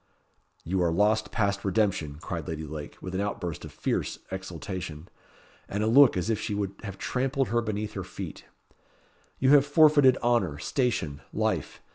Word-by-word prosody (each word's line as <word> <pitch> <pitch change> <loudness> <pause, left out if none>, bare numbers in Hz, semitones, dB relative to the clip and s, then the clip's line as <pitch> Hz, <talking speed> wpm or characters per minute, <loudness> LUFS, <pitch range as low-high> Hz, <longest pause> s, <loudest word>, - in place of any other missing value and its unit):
"You 95 +2 -1
are 85 -1 +2
lost 105 +5 +2
past 100 -2 0
redemption," 95 -7 0
cried 85 -3 -5
Lady 80 -1 -4
Lake 75 0 -7
with 95 - -6
an 95 - 0
outburst 90 -5 -3
of - - -9
fierce - - -2
exultation, 90 -3 -6 0.6
and 100 +2 -1
a - - +1
look 130 -1 +6
as 90 - -1
if 110 - 0
she 105 - -2
would 100 -1 -2
have 100 -3 -7
trampled 135 +1 -1
her 120 +1 +2
beneath 105 -1 -3
her 95 - -4
feet. - - -8 0.9
"You 130 +1 +3
have 145 -2 +8
forfeited 145 -3 +5
honour, 115 -11 +2
station, 85 - -1
life. - - -1
100 Hz, 165 wpm, -27 LUFS, 90-120 Hz, 0.9 s, have